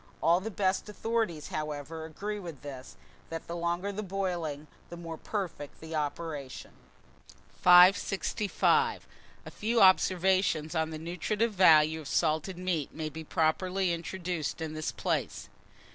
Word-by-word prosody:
All 170 Hz, +2 st, +5 dB
the 210 Hz, +4 st, -5 dB
best 190 Hz, -1 st, -1 dB
authorities, 215 Hz, -7 st, -2 dB
however, 155 Hz, +1 st, -5 dB
agree 205 Hz, +6 st, -5 dB
in 170 Hz, -6 st, -8 dB
this, 135 Hz, -3 st, -9 dB, 0.3 s
that 165 Hz, 0 st, -6 dB
the 170 Hz, -, -6 dB
longer 175 Hz, +3 st, -1 dB
the 205 Hz, +1 st, -4 dB
boiling 175 Hz, -7 st, -3 dB, 0.2 s
the 170 Hz, -, -8 dB
more 165 Hz, -1 st, -6 dB
perfect 170 Hz, -6 st, -5 dB
the 160 Hz, 0 st, -9 dB
operation. 150 Hz, -2 st, -4 dB, 0.9 s
565. 200 Hz, -, +4 dB, 0.4 s
A -, -, -8 dB
FEW 230 Hz, +2 st, 0 dB
OBSERVATIONS 185 Hz, -4 st, +3 dB
ON 160 Hz, -1 st, 0 dB
THE 160 Hz, -, -6 dB
NUTRITIVE 190 Hz, +7 st, -2 dB
VALUE 160 Hz, -4 st, +5 dB
OF 150 Hz, -, -10 dB
SALTED 160 Hz, +4 st, 0 dB
MEAT 180 Hz, -5 st, -2 dB
may 155 Hz, -1 st, -3 dB
be 160 Hz, +1 st, -8 dB
properly 180 Hz, +4 st, 0 dB
introduced 170 Hz, -2 st, -4 dB
in 160 Hz, -1 st, -4 dB
this 155 Hz, 0 st, -3 dB
place. -, -, -3 dB
170 Hz, 135 wpm, -30 LUFS, 155-190 Hz, 0.9 s, All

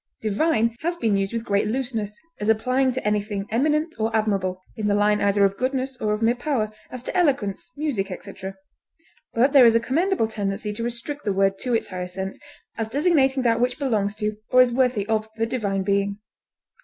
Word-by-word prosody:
Divine 230 Hz, +1 st, +1 dB
has 345 Hz, +2 st, -2 dB
been 220 Hz, -9 st, +1 dB
used 195 Hz, 0 st, 0 dB
with 230 Hz, 0 st, -3 dB
great 200 Hz, -2 st, +1 dB
looseness, 225 Hz, -4 st, -3 dB, 0.2 s
as 210 Hz, -, -1 dB
applying 255 Hz, +4 st, +2 dB
to 255 Hz, -4 st, -3 dB
anything 205 Hz, -1 st, -1 dB
eminent 305 Hz, +4 st, +1 dB
or 220 Hz, +1 st, +1 dB
admirable, 195 Hz, -4 st, 0 dB, 0.2 s
in 215 Hz, -3 st, -2 dB
the 205 Hz, -, +2 dB
line 210 Hz, 0 st, +3 dB
either 200 Hz, 0 st, +4 dB
of 195 Hz, 0 st, 0 dB
goodness 260 Hz, 0 st, -1 dB
or 210 Hz, -1 st, +1 dB
of 210 Hz, +1 st, -2 dB
mere 230 Hz, +1 st, +4 dB
power, 245 Hz, -4 st, -1 dB, 0.2 s
as 255 Hz, -1 st, -8 dB
to -, -, -5 dB
eloquence, 265 Hz, -, 0 dB
music, 275 Hz, -11 st, -1 dB
etc., 190 Hz, +1 st, -7 dB, 0.8 s
but 260 Hz, +5 st, +3 dB
there 275 Hz, -3 st, +8 dB
is 230 Hz, -, +4 dB
a -, -, +6 dB
commendable 300 Hz, -, +1 dB
tendency 210 Hz, -1 st, -3 dB
to 220 Hz, -, -6 dB
restrict 240 Hz, +5 st, -5 dB
the 205 Hz, -, 0 dB
word 195 Hz, 0 st, +2 dB
to 250 Hz, -2 st, 0 dB
its 225 Hz, -, -1 dB
higher 180 Hz, -1 st, -4 dB
sense, 190 Hz, +1 st, -5 dB, 0.4 s
as 220 Hz, -1 st, -2 dB
designating 275 Hz, -2 st, +2 dB
that 230 Hz, -1 st, +2 dB
which 245 Hz, 0 st, +1 dB
belongs 215 Hz, -8 st, 0 dB
to 210 Hz, 0 st, -2 dB
or 255 Hz, -, +4 dB
is 250 Hz, -, -1 dB
worthy 250 Hz, -5 st, +2 dB
of 220 Hz, 0 st, -1 dB
the 225 Hz, 0 st, 0 dB
Divine 205 Hz, -5 st, -1 dB
Being. 200 Hz, 0 st, 0 dB
225 Hz, 200 wpm, -24 LUFS, 205-255 Hz, 0.8 s, there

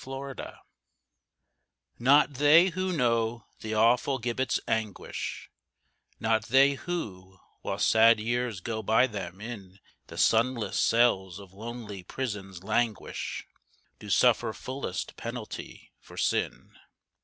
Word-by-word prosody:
THE -, -, -15 dB
PUNISHED 135 Hz, -1 st, -7 dB, 1.4 s
Not 140 Hz, +4 st, +5 dB
they 150 Hz, +7 st, +6 dB
who 185 Hz, +1 st, -2 dB
know 115 Hz, -6 st, 0 dB
the 110 Hz, 0 st, -4 dB
awful 120 Hz, +5 st, +3 dB
gibbet's 120 Hz, +2 st, -1 dB
anguish, 110 Hz, -3 st, -3 dB, 0.7 s
Not 110 Hz, -1 st, +1 dB
they 135 Hz, +3 st, +5 dB
who, 95 Hz, -, -6 dB, 0.2 s
while -, -, -3 dB
sad 115 Hz, 0 st, +5 dB
years 120 Hz, -2 st, -2 dB
go 110 Hz, +2 st, -3 dB
by 110 Hz, +4 st, +4 dB
them, 95 Hz, -6 st, -6 dB
in 100 Hz, -4 st, -8 dB, 0.3 s
The -, -, -11 dB
sunless 115 Hz, -2 st, +2 dB
cells 95 Hz, -6 st, +2 dB
of 100 Hz, -2 st, -13 dB
lonely 110 Hz, -2 st, -7 dB
prisons 95 Hz, -5 st, -5 dB
languish, 110 Hz, +1 st, -2 dB, 0.5 s
Do -, -, -10 dB
suffer -, -, +3 dB
fullest 130 Hz, -7 st, -5 dB
penalty -, -, -7 dB
for -, -, -15 dB
sin. -, -, -1 dB
115 Hz, 115 wpm, -28 LUFS, 105-130 Hz, 1.4 s, they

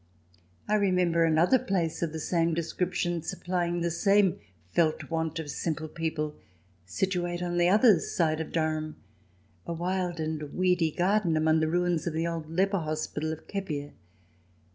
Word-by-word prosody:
I 210 Hz, -, 0 dB
remember 180 Hz, -5 st, +3 dB
another 165 Hz, +10 st, +4 dB
place 185 Hz, -9 st, -1 dB
of 170 Hz, -2 st, -1 dB
the 160 Hz, -, -5 dB
same 165 Hz, +1 st, +1 dB
descrip 170 Hz, +2 st, -2 dB
tion 175 Hz, -1 st, -1 dB
supplying 175 Hz, +1 st, -2 dB
the 170 Hz, 0 st, 0 dB
same 195 Hz, +1 st, +3 dB, 0.3 s
felt 160 Hz, -1 st, +1 dB
want 160 Hz, -1 st, -1 dB
of 155 Hz, -3 st, -4 dB
simple 155 Hz, 0 st, -3 dB
people, 155 Hz, -2 st, -3 dB, 0.5 s
situate 175 Hz, -, -1 dB
on 175 Hz, 0 st, -1 dB
the 175 Hz, 0 st, +4 dB
other 210 Hz, -2 st, +6 dB
side 160 Hz, -1 st, 0 dB
of 160 Hz, -, -6 dB
Durham, 155 Hz, -1 st, -1 dB, 0.7 s
a 170 Hz, -, -2 dB
wild 175 Hz, 0 st, -2 dB
and 155 Hz, -1 st, -2 dB
weedy 180 Hz, -3 st, +2 dB
garden 180 Hz, 0 st, +1 dB
among 160 Hz, 0 st, +3 dB
the 155 Hz, -, +1 dB
ruins 175 Hz, -1 st, 0 dB
of 170 Hz, -, -1 dB
the 165 Hz, +1 st, -1 dB
old 165 Hz, -2 st, -4 dB
leper 195 Hz, +4 st, +1 dB
hospital 155 Hz, 0 st, -3 dB
of 160 Hz, -, -7 dB
Kepier. 150 Hz, -8 st, -4 dB
170 Hz, 160 wpm, -28 LUFS, 160-180 Hz, 0.7 s, other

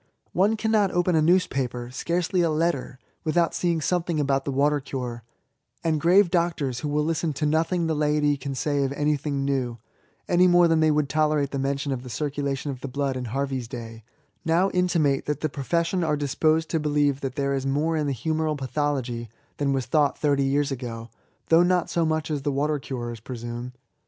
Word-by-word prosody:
One 205 Hz, +5 st, +3 dB
cannot 215 Hz, -2 st, +2 dB
open 175 Hz, 0 st, +1 dB
a 160 Hz, -, +4 dB
newspaper, 135 Hz, -8 st, +1 dB
scarcely 175 Hz, +6 st, 0 dB
a 170 Hz, -, +2 dB
letter, 155 Hz, -5 st, -1 dB, 0.3 s
without 170 Hz, +1 st, +1 dB
seeing 170 Hz, -2 st, 0 dB
some 180 Hz, +3 st, +1 dB
thing 165 Hz, -2 st, -2 dB
about 135 Hz, -1 st, +1 dB
the 140 Hz, -, -1 dB
Water 145 Hz, +2 st, +2 dB
cure; 125 Hz, -3 st, -5 dB, 0.6 s
and 155 Hz, -2 st, +1 dB
grave 180 Hz, +2 st, +5 dB
doctors, 165 Hz, -8 st, 0 dB
who 150 Hz, -, -3 dB
will 150 Hz, +1 st, +1 dB
listen 165 Hz, -1 st, -1 dB
to 150 Hz, +2 st, -2 dB
nothing 165 Hz, +3 st, +1 dB
the 160 Hz, -, 0 dB
laity 150 Hz, -1 st, +2 dB
can 135 Hz, 0 st, -5 dB
say 145 Hz, +1 st, 0 dB
of 135 Hz, -, -1 dB
anything 145 Hz, -1 st, -1 dB
new, 130 Hz, -4 st, -1 dB, 0.5 s
(any 180 Hz, +1 st, +4 dB
more 175 Hz, -1 st, +6 dB
than 165 Hz, -1 st, +3 dB
they 155 Hz, 0 st, +4 dB
would 150 Hz, -1 st, +2 dB
tolerate 150 Hz, -1 st, +1 dB
the 140 Hz, -, -2 dB
mention 140 Hz, +1 st, -1 dB
of 130 Hz, -2 st, -2 dB
the 125 Hz, -, -9 dB
circulation 140 Hz, 0 st, -2 dB
of 130 Hz, -2 st, -8 dB
the 140 Hz, -, -4 dB
blood 135 Hz, 0 st, -2 dB
in 130 Hz, -1 st, -4 dB
Harvey's 135 Hz, 0 st, -2 dB
day,) 115 Hz, -2 st, -8 dB, 0.4 s
now 170 Hz, +4 st, +2 dB
intimate 165 Hz, -7 st, +1 dB
that 150 Hz, -1 st, -2 dB
the 155 Hz, -, 0 dB
profession 170 Hz, +6 st, -1 dB
are 150 Hz, -2 st, +1 dB
disposed 155 Hz, +3 st, +1 dB
to 160 Hz, -, 0 dB
believe 145 Hz, -2 st, +1 dB
that 130 Hz, -1 st, -4 dB
there 140 Hz, -1 st, 0 dB
is 135 Hz, 0 st, -1 dB
more 150 Hz, +4 st, +1 dB
in 150 Hz, -2 st, 0 dB
the 140 Hz, -, -1 dB
humoral 155 Hz, +4 st, -1 dB
pathology 130 Hz, -4 st, -2 dB, 0.3 s
than 140 Hz, -1 st, 0 dB
was 135 Hz, -2 st, 0 dB
thought 150 Hz, -3 st, +2 dB
thirty 140 Hz, -2 st, +2 dB
years 140 Hz, +1 st, +1 dB
ago, 120 Hz, -3 st, -6 dB, 0.4 s
though 165 Hz, +1 st, +6 dB
not 180 Hz, 0 st, +2 dB
so 170 Hz, -, +1 dB
much 155 Hz, 0 st, -1 dB
as 145 Hz, -2 st, -1 dB
the 145 Hz, -, -1 dB
water 145 Hz, +2 st, 0 dB
curers 120 Hz, -4 st, -5 dB
presume. 120 Hz, +1 st, -6 dB
145 Hz, 200 wpm, -25 LUFS, 135-160 Hz, 0.6 s, more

